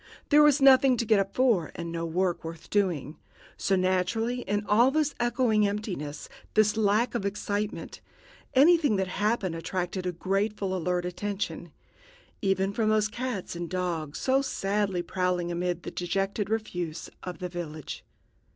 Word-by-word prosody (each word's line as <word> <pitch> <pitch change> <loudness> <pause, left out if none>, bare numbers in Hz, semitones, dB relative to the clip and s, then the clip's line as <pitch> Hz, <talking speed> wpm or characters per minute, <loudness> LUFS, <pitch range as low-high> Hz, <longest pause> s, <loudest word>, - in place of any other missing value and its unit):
There 295 0 +7
was 295 -1 +5
nothing 265 -1 +7
to 235 - -1
get 215 -1 +4
up 195 0 -2
for, 230 - +2
and 170 0 -5
no 165 0 -3
work 175 0 0
worth 165 0 -9
doing. 175 -8 0 0.4
So, 195 - +1
naturally, 190 +7 0
in 205 -1 -2
all 225 +6 +5
this 300 0 +1
echoing 235 -3 +2
emptiness, 195 -8 -4 0.3
this 215 0 +4
lack 215 +2 +2
of 235 - -2
excitement, 205 +1 -3 0.5
anything 295 -3 +5
that 190 -1 0
happened 205 -2 0
attracted 180 +2 -3
a - - 0
gratefully 195 +2 -1
alert 180 0 -1
attention 180 -3 -4 0.7
even 195 0 +1
from 215 0 +1
those 215 0 +2
cats 230 -6 -4
and 170 -1 -5
dogs 170 -5 -3
so 265 +1 +2
sadly 195 -7 -1
prowling 180 -1 -1
amid 175 0 -2
the - - -6
dejected 195 +3 -2
refuse 180 -7 -3
of 180 -1 -6
the 180 - -4
village. 160 -4 -6
195 Hz, 150 wpm, -28 LUFS, 175-220 Hz, 0.7 s, There